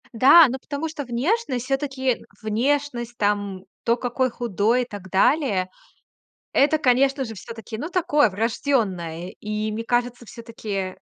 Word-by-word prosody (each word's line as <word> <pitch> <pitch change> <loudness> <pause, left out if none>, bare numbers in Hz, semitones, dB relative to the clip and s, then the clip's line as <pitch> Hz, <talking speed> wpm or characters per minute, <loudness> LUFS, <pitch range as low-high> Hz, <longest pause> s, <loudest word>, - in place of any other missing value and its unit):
Да, 275 +8 +8
ну, 260 - -3
потому 290 +4 -4
что 295 -3 -6
внешность 255 - -1
всё-таки 265 -2 -1 0.2
внешность 240 +2 -1
там, 205 -2 -1 0.2
то, 235 - +3
какой 250 +1 -1
худой 235 0 0
и - - -7
так 205 -5 -10
далее 200 - +2 0.8
Это, 300 +3 +3
конечно 270 0 +2
же, 225 -2 -7
всё-таки, 225 +2 -8
ну, 300 +10 -5
такое 300 - +3
врождённое. 190 - -1
И 215 0 -3
мне 225 +2 -4
кажется, 245 0 -1
всё-таки, 215 -5 -6
240 Hz, 135 wpm, -23 LUFS, 210-270 Hz, 0.8 s, Да